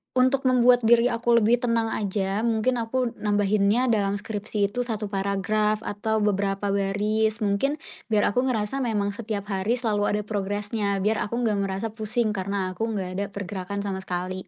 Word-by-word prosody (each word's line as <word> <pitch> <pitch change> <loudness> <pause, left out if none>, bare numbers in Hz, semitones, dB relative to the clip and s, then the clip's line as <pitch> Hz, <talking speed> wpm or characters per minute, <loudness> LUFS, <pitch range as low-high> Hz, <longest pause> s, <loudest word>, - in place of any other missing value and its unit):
untuk 260 +1 +3
membuat 250 -1 +5
diri 235 +1 +5
aku 235 0 +2
lebih 235 +3 +4
tenang 230 -2 0
aja, 195 -1 -1
mungkin 235 +2 +1
aku 235 +1 -1
nambahinnya 210 +3 +2
dalam 200 -2 +1
skripsi 205 -1 -2
itu 245 - -4
1 220 -4 -2
paragraf 210 +2 0
atau 215 +1 -1
beberapa 200 0 0
baris. 210 +3 0
Mungkin, 210 +8 +1 0.3
biar 215 -3 +2
aku 250 +5 +1
ngerasa 225 +2 -1
memang 210 -5 0
setiap 210 -1 -4
hari 195 +5 0
selalu 215 -4 0
ada 210 - 0
progresnya. 205 0 -2
Biar 215 +2 +1
aku 235 +3 -2
nggak 210 -3 +1
merasa 195 +3 -2
pusing 220 +1 -1
karena 190 -1 -2
aku 225 +5 -2
nggak 185 -2 -3
ada 200 - 0
pergerakan 200 0 -5
sama 195 -1 -3
sekali. 185 0 -4
210 Hz, 165 wpm, -25 LUFS, 200-230 Hz, 0.3 s, membuat